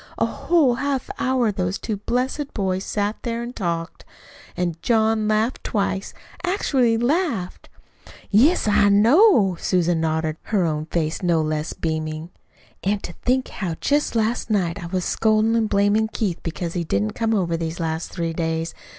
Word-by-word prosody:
A - - +2
whole 315 -8 +2
half 275 +1 -2
hour 255 -4 +2
those 185 -1 -2
two 215 -3 -4
blessed 255 +7 -2
boys 190 -2 -1
sat 205 +1 -1
there 235 -1 -3
an' 240 +1 -6
talked; 170 -5 -3 0.5
an' 175 -1 0
John 220 -1 +2
laughed 215 +4 0
twice, 200 -2 -1 0.3
actually 270 - +2
laughed." 240 - -1 0.6
"Yes, 250 - +4
I 205 -1 +4
know," 230 - +5
nodded 180 - -7
Susan, 175 -3 +1
her 160 +4 -1
own 155 -1 -2
face 160 -1 -2
no 175 -3 +2
less 155 0 -2
beaming. 155 +1 -3 0.5
"An' 205 +2 +1
to 175 - -7
think 255 +1 +1
how 175 -5 -4
just 290 -3 +1
last 225 +2 0
night 195 -3 0
I - - -5
was 185 0 -2
scoldin' 220 +1 +2
an' 225 -1 +2
blamin' 205 +2 +2
Keith 190 -6 -2
because 170 0 -4
he 175 - -1
didn't 105 -8 0
come 225 -1 0
over 175 -4 0
these 165 +1 -4
last 160 0 -2
three 165 -2 -3
days. 165 0 -2
200 Hz, 160 wpm, -22 LUFS, 170-230 Hz, 0.6 s, know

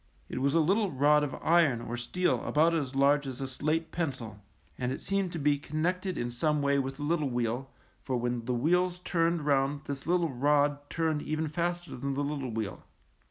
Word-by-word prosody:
It 130 - -3
was 140 +3 +2
a - - +5
lit 175 +6 +3
tle 210 -5 0
rod 150 +2 +4
of 145 - -3
iron 160 -7 +4
or 120 - -4
steel 175 +10 0
about 160 +3 +3
as 140 -5 -2
large 140 +1 +3
as 130 -1 -6
a 135 - -2
slate 155 +5 -1
pencil, 130 - -4 0.4
and 125 0 -2
it - - -3
seemed 195 -2 -1
to - - -3
be 145 -1 +2
connected 180 +6 -2
in 120 0 -2
some 150 +5 +1
way 140 0 +2
with 135 0 -3
the 145 - -5
little 150 -2 +1
wheel, 120 +2 -2 0.3
for 130 0 -2
when 120 -1 -2
the 125 0 0
wheels 180 +7 +2
turned 170 -3 0
round 140 0 +1
this 140 0 -6
little 170 -2 +2
rod 145 +2 +2
turned 160 -2 0
even 155 +1 -2
faster 175 +2 -2
than 135 +2 -3
the 145 - 0
little 140 -3 -3
wheel. 110 -3 -4
145 Hz, 205 wpm, -30 LUFS, 130-165 Hz, 0.4 s, a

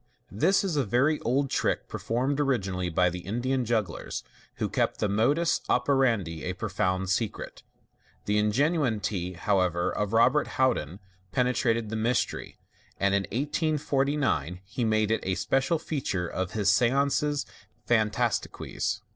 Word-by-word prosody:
— - - -38
This 190 +3 +4
is 180 -6 -1
a 140 - +3
very 130 +8 +2
old 135 +2 0
trick, - - 0
performed 130 +5 -1
originally 95 -10 0
by 90 +2 +2
the 90 - -5
Indian 120 +7 -1
jugglers, 110 -6 -2 0.3
who - - -1
kept - - -1
the - - +1
modus 135 +12 +2
operandi 120 - +1
a 90 - -2
pro 105 +4 -5
found 95 0 0
secret. 100 +4 -2 0.6
The 105 +1 +2
ingenuity, 105 - 0
however, 90 -2 +1
of 105 -1 -2
Robert 125 +6 +4
Houdin 95 - +1 0.3
penetrated 115 -1 +1
the 110 - -3
mystery, 115 +3 -1 0.4
and 100 0 +2
in 100 0 +1
1849 140 - 0
he 120 +5 -3
made 110 -1 +2
it 115 - +2
a 95 0 -1
special 135 - +1
feature 135 - -2
of 95 +1 -3
his 100 -3 +3
seances 140 +5 +2 0.4
fan* 110 -3 +3
tastiques. 120 0 -2
115 Hz, 140 wpm, -27 LUFS, 95-135 Hz, 0.6 s, This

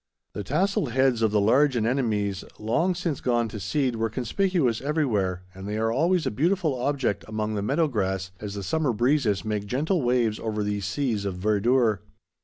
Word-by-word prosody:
The 105 - -4
tasselled 180 - 0
heads 130 -3 +2
of 110 - +3
the 105 0 +2
large 130 +7 +4
anemones, 110 -5 0
long 165 +12 0
since 170 -5 -3
gone 120 -2 +1
to 105 - -6
seed, 125 - 0
were 115 0 0
conspicuous 130 - 0
everywhere, 110 - 0
and 95 +1 -8
they 105 +1 -2
are 115 +1 +1
always 165 +7 +2
a - - 0
beautiful 165 - +1
object 130 -3 -1
among 110 0 -2
the 105 - -1
meadow 145 +10 +1
grass 95 -6 -2
as 105 -1 -6
the 100 - -5
summer 145 - 0
breezes 120 -3 +1
make 105 -1 -2
gentle 150 - 0
waves 120 -3 +1
over 110 -2 -2
these 105 -2 -2
seas 110 0 -1
of 100 -2 -3
verdure. 110 +3 +2
115 Hz, 185 wpm, -26 LUFS, 105-140 Hz, -, large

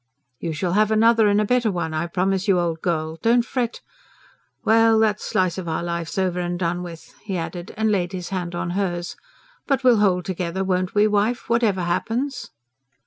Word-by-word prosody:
"You 170 - -3
shall 170 +3 -2
have 210 +1 +3
another 225 0 +4
and 205 0 +3
a 210 - +2
better 240 -1 +2
one, 175 -3 -3
I 155 +2 -1
promise 190 +3 0
you, 195 -2 +4
old 165 -2 -2
girl 160 -2 -2
don't 235 +1 +3
fret. 245 -2 -3 0.8
Well, 225 0 +5
that 215 -1 +2
slice 185 0 0
of 180 - -6
our 160 +1 -2
life's 170 0 -4
over 185 -2 0
and 175 0 -2
done 175 0 -1
with," 170 -2 -10
he 195 -3 -4
added, 170 +1 -5
and 220 0 +1
laid 180 -3 0
his 180 -2 -5
hand 175 -2 -3
on 175 0 -3
hers. 175 -2 -2 0.5
"But 270 -2 +1
we'll 250 -3 +6
hold 185 -4 +2
together, 185 0 -2
won't 185 0 -1
we, 205 +1 +5
wife, 215 +4 0
whatever 225 -5 +2
happens?" 235 +10 -2
190 Hz, 195 wpm, -22 LUFS, 175-220 Hz, 0.8 s, we'll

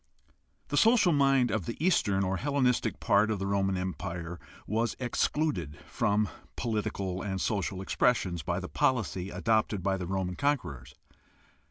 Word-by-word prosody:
The - - -1
social 225 -6 +5
mind 135 -3 +3
of 105 -6 -2
the 115 - -4
eastern 105 - +2
or 95 0 0
Hellenistic 125 -3 +1
part 105 +2 +3
of 110 - 0
the 95 - -3
Roman 95 -1 +1
Empire 90 -2 -4 0.3
was 115 +3 -1
excluded 125 - -1
from 105 +1 +1 0.3
political 100 -5 -2
and 95 -2 -3
social 95 -2 -1
expres 125 +5 +3
sions 85 -3 -4
by - - -2
the - - -6
policy 100 -7 0
adopted 110 -3 0
by 95 0 +1
the 90 -2 -5
Roman 95 -1 -2
conquerors. 70 - -2
100 Hz, 150 wpm, -29 LUFS, 95-120 Hz, 0.3 s, social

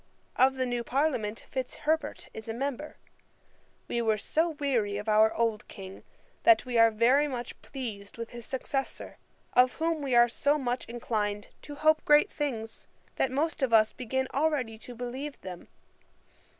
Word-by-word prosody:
Of 265 +1 +4
the 260 -1 0
new 245 -1 -2
Parliament 245 -6 -1
Fitzherbert 290 +4 -2
is 220 - -8
a 225 - -3
member. 280 +3 -4 0.9
We 235 - -1
were 220 -2 +2
so 320 +11 +1
weary 260 -10 -1
of 210 +2 -6
our 215 +1 +5
old 225 -2 0
King, 190 -1 -10 0.4
that 345 -5 +5
we 250 -1 -4
are 230 0 +8 0.4
much 245 -3 -6
pleased 220 -8 -7
with 230 0 -6
his 240 -1 -9
successor; 270 +1 -4 0.3
of 250 0 +5
whom 325 -1 -1
we 270 -3 0
are 240 0 +7
so 285 +5 +1
much 250 -3 -2
inclined 210 -3 -3
to 290 - -9
hope 310 +1 +3
great 295 +7 +5
things, 225 -7 -4 0.3
that 265 - +2
most 305 +3 -1
of 260 -3 +1
us 215 -1 +5
begin 260 +2 -2
already 275 -7 0
to 245 +1 -10
believe 255 +4 -5
them. 180 -2 -8
250 Hz, 160 wpm, -29 LUFS, 225-285 Hz, 0.9 s, are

